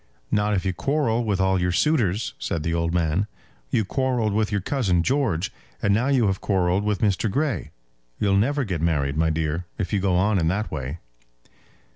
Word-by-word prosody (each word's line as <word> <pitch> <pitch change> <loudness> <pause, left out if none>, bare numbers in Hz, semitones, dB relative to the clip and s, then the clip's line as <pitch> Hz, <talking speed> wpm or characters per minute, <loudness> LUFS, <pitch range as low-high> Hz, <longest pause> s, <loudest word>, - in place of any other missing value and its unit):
"Not 105 0 +2
if 95 - -1
you 95 - 0
quarrel 120 - 0
with 105 -4 0
all 95 -1 +2
your 90 0 +1
suitors," 110 - +1
said 80 - -2
the 85 - -1
old 85 0 0
man. 85 +3 +1 0.4
"You 110 - +1
quarrelled 125 -1 0
with 110 0 +1
your 100 - +1
cousin 95 -6 +1
George, 110 - 0 0.3
and 100 - +2
now 115 +6 +2
you 135 -5 +3
have 95 -1 0
quarrelled 95 -1 +1
with 105 -2 -1
Mr. 105 +1 +1
Grey. 135 - -1 0.5
You'll 100 -2 +2
never 140 +8 +2
get 90 -9 -3
married, 75 -4 +1
my 80 +1 +2
dear, 80 +2 -1
if 100 +1 -3
you 100 - +3
go 95 -1 +1
on 100 +2 +2
in 80 - +1
that 100 +5 -1
way." 70 0 -4
100 Hz, 195 wpm, -24 LUFS, 85-110 Hz, 0.5 s, you